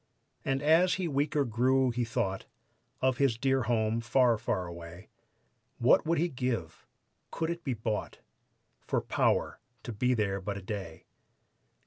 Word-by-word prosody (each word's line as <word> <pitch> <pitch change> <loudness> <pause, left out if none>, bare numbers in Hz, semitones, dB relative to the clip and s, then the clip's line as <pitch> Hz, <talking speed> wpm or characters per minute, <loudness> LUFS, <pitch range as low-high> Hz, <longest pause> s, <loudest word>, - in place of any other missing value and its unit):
And 135 +1 -1
as 165 +4 +4
he 185 -2 -2
weaker 145 0 +1
grew 130 +3 +2
he 120 +1 -1
thought 95 -4 -2 0.5
Of 130 -1 +2
his 135 -5 +2
dear 135 +1 +1
home, 115 -1 0
far, 120 0 +3
far 95 -5 -1
away; 85 +1 -10 0.7
What - - +4
would 165 +1 +2
he 170 - +2
give 125 - -4 0.4
could 165 0 -2
it 170 0 -6
be 130 -5 -2
bought 110 -1 -3 0.7
For - - +1
power - - 0 0.2
to 120 - -5
be 125 +4 +1
there 100 -3 -1
but 100 +1 -4
a - - -7
day. 95 -5 -6
120 Hz, 150 wpm, -30 LUFS, 105-135 Hz, 0.7 s, as